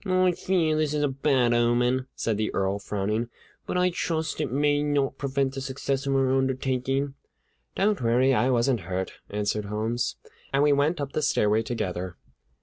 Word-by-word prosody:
"I 185 -2 +3
fear 175 -3 +1
that 155 - +1
this 155 -1 0
is 150 - +1
a - - +3
bad 135 -3 +2
omen," 120 +2 +2
said 115 - -1
the 110 0 -1
Earl, 95 +1 0
frowning; 105 +3 -2 0.4
"but - - -1
I 180 0 +3
trust 160 -2 -2
it 145 -6 -2
may 145 +2 +2
not 145 -2 0
prevent 135 -1 0
the 135 - -5
success 135 +1 -2
of 135 - +1
our 135 -1 +2
undertaking." 135 +1 0 0.6
"Don't 205 +1 +1
worry! 125 +3 +3
I 125 +1 +2
wasn't 120 0 +2
hurt," 95 0 -2 0.2
answered 105 0 -1
Holmes. 110 +3 -2 0.4
And 140 +1 +3
we 145 -1 +5
went 150 +4 +1
up 140 -1 -3
the 155 - -1
stairway 110 -7 +2
together. 95 -6 -4
135 Hz, 180 wpm, -26 LUFS, 115-145 Hz, 0.6 s, we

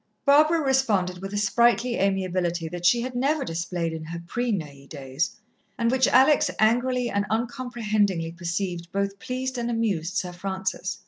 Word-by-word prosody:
Barbara 305 +3 +5
responded 220 - +1
with 195 0 -6
a 205 - -3
sprightly 235 +4 +2
amiability 185 -3 0
that 175 +1 -1
she 235 +5 +4
had 255 +1 -4
never 275 +3 0
displayed 170 -1 -3
in 160 -1 -6
her 170 +1 -6
pre 240 +7 -2
Neuilly 145 -8 -5
days, 135 +7 -3 0.4
and 230 -1 +1
which 260 0 +3
Alex 275 +2 +5
angrily 245 +2 +2
and 200 0 +1
uncomprehendingly 215 -7 -1
perceived 175 0 -4
both 200 0 -2
pleased 255 +1 -3
and 235 0 -2
amused 195 -7 -1
Sir 180 - -2
Francis. 190 +1 -3
200 Hz, 155 wpm, -25 LUFS, 175-245 Hz, 0.4 s, Barbara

